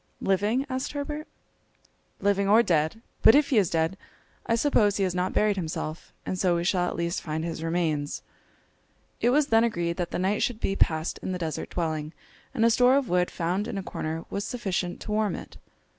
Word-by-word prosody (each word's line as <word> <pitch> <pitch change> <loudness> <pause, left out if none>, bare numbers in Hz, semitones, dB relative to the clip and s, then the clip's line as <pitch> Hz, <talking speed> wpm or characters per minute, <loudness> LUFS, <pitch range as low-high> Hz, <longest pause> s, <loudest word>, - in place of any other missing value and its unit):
"Living?" 205 +7 +1
asked 260 0 -3
Herbert. 295 +1 -4 0.9
"Living 200 0 +1
or 220 +3 +6
dead. 165 +4 0 0.2
But 225 - +8
if 290 0 +4
he 235 - +5
is 190 -5 +1
dead, 165 +3 0 0.5
I 230 - +3
suppose 225 -5 +3
he 200 - +1
has 185 -2 0
not 180 +1 -1
buried 210 -2 +2
himself, 160 -2 -4
and 185 - -3
so 180 -2 +3
we 170 - -1
shall 180 -1 +1
at - - -3
least 170 0 -2
find 160 0 -3
his 165 -1 -4
remains!" 165 -4 -1 1.0
It 240 - +4
was 290 +4 +4
then 225 0 +5
agreed 170 -7 -1
that 175 -2 -2
the - - -3
night 190 +3 0
should 240 -3 0
be 195 - -1
passed 160 -3 +1
in 185 - -4
the - - -2
deserted 160 -4 -5
dwelling, 155 -2 -2 0.4
and 230 -4 +1
a 230 - +5
store 250 +3 +5
of 275 -5 -1
wood 180 0 +2
found 180 +5 -2
in 200 - -4
a 195 - -3
corner 160 -2 -4
was 200 - -2
sufficient 190 -7 -3
to - - -6
warm 215 -1 +1
it. - - -10
190 Hz, 205 wpm, -27 LUFS, 170-225 Hz, 1.0 s, But